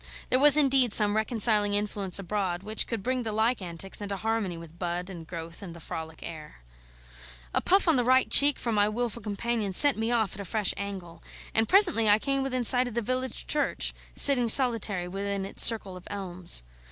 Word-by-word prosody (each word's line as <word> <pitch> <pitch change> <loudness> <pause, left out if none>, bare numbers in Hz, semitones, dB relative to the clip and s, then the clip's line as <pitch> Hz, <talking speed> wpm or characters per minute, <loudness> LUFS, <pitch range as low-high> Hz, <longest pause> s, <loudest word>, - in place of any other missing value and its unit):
There 255 - +2
was 295 +1 +5
indeed 265 -5 +1
some 210 -1 +3
reconciling 215 -2 +2
influence 205 -3 -2
abroad, 190 -2 -4
which 215 +1 -5
could 225 -5 -5
bring 255 +1 -2
the 225 -2 -5
like 220 +2 -1
antics 180 +3 -6
into 200 -1 -6
harmony 220 -4 -3
with 165 0 -14
bud 180 +1 -5
and 165 -3 -11
growth 165 +1 -9
and 175 -4 -10
the - - -12
frolic 160 0 -9
air. 155 - -11 0.9
A - - -1
puff 390 0 +1
on 320 -4 +2
the 245 - 0
right 260 +2 +2
cheek 285 0 +4
from 235 - -4
my 205 0 +1
wilful 235 +1 -4
companion 215 -1 -4
sent 280 +3 +5
me 225 +1 -2
off 225 -5 -1
at - - -9
a - - -8
fresh 210 +2 -1
angle, 185 -5 -8 0.3
and 225 0 0
presently 350 - +4
I 205 - +5
came 275 +3 -3
in 255 -2 -3
sight 250 +1 +4
of 240 - -9
the 235 - -1
village 255 +2 -5
church, 295 -1 -2 0.2
sitting 250 -4 +5
solitary 220 -8 +4
within 195 +1 -5
its 195 - +1
circle 210 -5 +4
of 180 - -13
elms. 185 - -1
210 Hz, 200 wpm, -26 LUFS, 185-245 Hz, 0.9 s, was